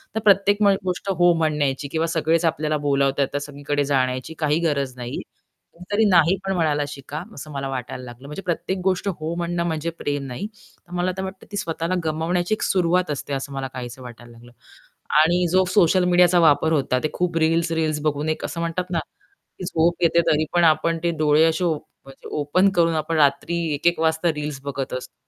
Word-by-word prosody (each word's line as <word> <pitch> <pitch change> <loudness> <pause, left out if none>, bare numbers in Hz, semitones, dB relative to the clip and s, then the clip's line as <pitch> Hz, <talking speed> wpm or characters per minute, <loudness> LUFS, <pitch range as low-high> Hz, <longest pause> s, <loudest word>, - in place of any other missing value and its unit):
तर - - +1
प्रत्येक 200 +1 +4
म 205 - +6 0.2
गोष्ट 185 +2 -3
हो 175 -2 +4
म्हणायची 150 -4 0
किंवा 160 +1 0
सगळेच 165 +1 +1
आपल्याला 155 -1 0
बोलावतात 140 0 +2
तर - - 0
सगळीकडे 145 0 -2
जाण्याची 130 0 -1
काही 155 0 +1
गरज 140 -3 -2
नाही. 120 0 -5 0.5
कधीतरी 205 +5 0
नाही 175 0 +5
पण 195 - 0
म्हणायला 155 -5 +1
शिका 145 +1 -7
असं 150 +2 -9
मला 135 -1 -4
वाटायला 130 -1 -5
लागलं. 125 +2 -11
म्हणजे 150 +6 -6
प्रत्येक 180 +2 -2
गोष्ट 190 +1 0
हो 165 -4 -3
म्हणणं 170 0 -2
म्हणजे 160 0 -2
प्रेम 145 -1 -2
नाही, 125 +10 -5
तर 205 -4 -24
मला 180 +1 0
वाटतं 190 0 -7
ती 205 - -4
स्वतःला 165 -2 -2
गमावण्याची 170 +5 0
सुरुवात 180 -2 +1
असते, 145 0 -4
असं 140 +1 -4
मला 135 -1 -3
काहीसं 125 0 -7
वाटायला 120 -1 -11
लागलं. 120 +1 -16 0.7
आणि 175 +3 +3
जो 185 +1 +4
सोशल 185 -1 +4
मीडियाचा 180 0 +5
वापर 160 -1 +4
होता 135 -4 +1
ते 155 - +1
खूप 175 -2 -1
रील्स-रील्स 160 -1 +1
बघून 150 0 -1
एक 155 - -2
असं 170 - -5
म्हणतात 170 +2 -2
ना, 170 - +1 0.6
की - - -6
झोप 170 -1 +1
येते 170 0 +4
तरी 155 0 +2
पण 175 0 +3
आपण 165 +1 +3
ते 170 - +2
डोळे 150 0 +4
असे 165 +2 +1
ओप 165 -3 +2 0.3
म्हणजे 135 0 -13
ओपन 165 +7 +3
करून 165 -1 +3
आपण 155 +1 -1
रात्री 150 +3 +2 0.2
1:00-1:00 170 +4 +1
वाजता 160 +1 +2
रील्स 150 -2 -4
बघत 140 -1 -4
असतो. 130 0 -6
160 Hz, 190 wpm, -22 LUFS, 145-175 Hz, 0.7 s, म